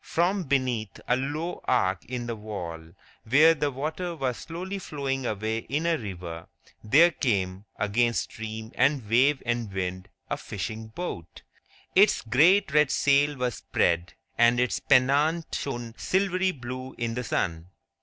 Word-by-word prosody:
From 180 +2 0
beneath 130 -6 -1
a 125 - +3
low 150 +6 -3
arch 95 -8 +1
in 120 -1 -4
the 120 -1 -3
wall, 85 -7 -7 0.3
where 150 +8 +6
the 150 -2 -1
water 155 +6 -4
was 130 -5 -2
slowly 185 +4 -6
flowing 135 -6 -3
away 110 +2 -2
in 145 +7 -3
a 170 -1 +3
river, 90 - -7 0.4
there 160 +11 +6
came, 100 - -1
against 115 +3 +1
stream 110 0 -7
and 130 -4 +2
wave 130 +6 +3
and 120 -3 -1
wind, 95 0 -4 0.2
a - - -2
fishing 110 +3 -5
boat. 110 - -7 0.5
Its 200 +3 +5
great 155 - +4
red 150 -2 +5
sail 145 +1 +3
was 125 -2 -2
spread, 85 +2 0 0.2
and 120 +1 +5
its 125 0 +1
pennant 145 +6 +2
shone 120 -4 -4
silvery 190 0 +1
blue 130 -2 -7
in 115 -1 -2
the 125 +2 -3
sun. 85 -7 -2
125 Hz, 145 wpm, -27 LUFS, 110-150 Hz, 0.5 s, where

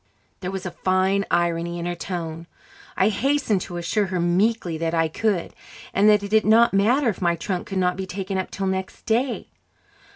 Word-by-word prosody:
There 180 - -4
was 190 -1 -5
a 180 - -3
fine 190 +2 +1
irony 170 0 0
in 170 - -4
her 175 - -1
tone. 165 -2 -5 0.5
I 195 - +4
hastened 260 -3 +1
to 175 -1 -6
assure 195 +4 0
her 185 -1 -2
meekly 180 +1 +1
that 165 0 -1
I 165 -1 +2
could, 195 +2 -1 0.4
and 205 +2 +5
that 210 -1 +4
it 200 - -5
did 220 0 +4
not 225 +2 +5
matter 235 +7 +3
if 200 - -4
my 170 -1 +2
trunk 180 +2 -4
could 195 - -4
not 180 -1 +1
be 190 -1 -4
taken 190 0 -3
up 185 - -3
till 195 - -4
next 190 0 -3
day. 240 +3 0
190 Hz, 200 wpm, -23 LUFS, 175-210 Hz, 0.5 s, and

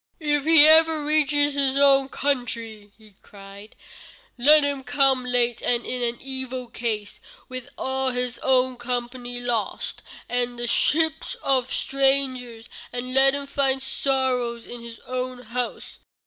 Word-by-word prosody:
"If 295 -2 -1
he 320 -2 +7
ever 315 -1 +5
reaches 295 -1 +2
his 275 -1 0
own 275 -1 +4
country," 230 -7 -3
he 215 -2 -20
cried, 200 +1 -14 0.6
"let 295 +4 +5
him 285 -2 -2
come 270 -1 +2
late 245 -1 0
and 240 -1 0
in 250 - -3
an 240 0 0
evil 260 -2 -5
case, 220 -4 -4 0.3
with 255 +1 -7
all 265 0 -1
his 250 -1 -2
own 255 -1 +1
company 245 0 -4
lost, 240 -3 -3 0.3
and 245 0 0
in 245 - -14
the 240 0 -4
ship 320 +6 +1 0.2
of 260 -2 +1
strangers, 260 -4 -1 0.2
and 245 +1 -5
let 270 +1 +5
him 280 0 -4
find 275 -1 0
sorrows 260 -3 -1
in 240 -1 -8
his 230 -1 -9
own 255 0 -5
house." 245 +2 -5
255 Hz, 145 wpm, -23 LUFS, 240-275 Hz, 0.6 s, he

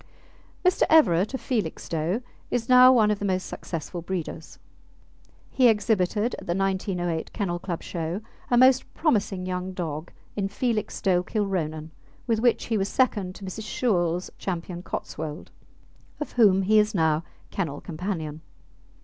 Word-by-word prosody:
Mr. 365 - +3
Everett, 210 - +4
of - - -5
Felixstowe, 180 - -2 0.3
is 235 -2 -1
now 255 0 +8
one 220 -4 +4
of 210 - -1
the - - -5
most 185 -2 0
successful 170 +1 -6
breeders. 170 -2 -5 0.9
He 255 -2 +5
exhibited 210 0 +2
at - - -12
the 170 - 0
1908 185 -3 -1
Kennel 175 -4 -2
Club 175 -2 -5
show 170 +4 -3 0.3
a 245 - +3
most 255 +1 +5
promising 205 - +1
young 185 0 -3
dog 165 -2 -4 0.2
in 200 -2 -1
Felixstowe 200 -4 0
Kilronan, 175 -6 -2 0.3
with 230 -3 +1
which 240 0 +2
he 225 -2 0
was 195 +1 -1
second 205 -8 +1
to 200 - -9
Mrs. 210 +3 -6
Shewell's 180 -8 0
Ch. - - -14 0.4
Cotswold, 155 -3 -6 0.7
of 300 - -4
whom 200 -5 +4
he 215 +3 +5
is 210 0 +1
now 160 -2 +2 0.3
kennel 160 -7 -3
companion. 160 -3 -5
190 Hz, 140 wpm, -26 LUFS, 170-220 Hz, 0.9 s, now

